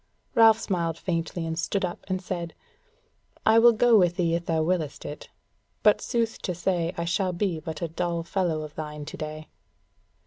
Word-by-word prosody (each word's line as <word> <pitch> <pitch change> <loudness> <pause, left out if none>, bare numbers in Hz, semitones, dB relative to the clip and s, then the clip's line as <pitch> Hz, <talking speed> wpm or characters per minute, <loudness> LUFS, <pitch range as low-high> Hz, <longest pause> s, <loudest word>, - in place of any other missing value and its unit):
Ralph 225 -1 +6
smiled 170 -4 -1
faintly 165 -1 -2
and 165 0 -3
stood 190 +3 0
up, 175 - -6
and 185 -1 -1
said: 170 -2 -4 0.9
"I 220 +1 +6
will 240 +1 +8
go 230 0 +5
with 175 -2 +3
thee 170 -2 +1
if 170 0 -2
thou 160 -1 +1
willest 160 -4 -2
it, 145 - -7 0.5
but - - +5
sooth 230 -2 -1
to 180 - -3
say 175 -1 0
I 170 - -2
shall 180 +2 0
be 175 -2 -1
but 160 +1 -6
a - - 0
dull 170 +1 -2
fellow 170 -3 -1
of 150 -1 -9
thine 150 -1 -6
to - - -7
day." 155 0 -6
170 Hz, 185 wpm, -26 LUFS, 160-190 Hz, 0.9 s, will